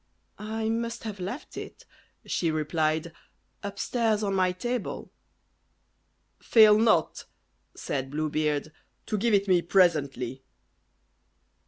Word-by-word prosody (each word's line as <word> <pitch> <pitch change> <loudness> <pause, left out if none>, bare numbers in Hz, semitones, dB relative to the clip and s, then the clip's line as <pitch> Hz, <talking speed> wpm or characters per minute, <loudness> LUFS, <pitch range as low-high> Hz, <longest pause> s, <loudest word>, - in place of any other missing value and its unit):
"I 220 +1 -3
must 230 +1 -2
have 210 -3 -6
left 200 +11 -6
it," - - -9 0.4
she 170 - 0
replied, 155 +1 -1 0.5
"upstairs 215 +2 -1
on 200 -1 0
my 185 -1 +2
table." 240 +7 -4 1.3
"Fail 215 -2 +6
not," 220 -8 +2 0.5
said 135 -1 -3
Blue 155 +2 -2
Beard, 150 0 -1 0.3
"to - - -2
give 230 0 +3
it 200 0 +1
me 180 -2 +4
presently." 145 -8 +1
185 Hz, 110 wpm, -27 LUFS, 155-220 Hz, 1.3 s, Fail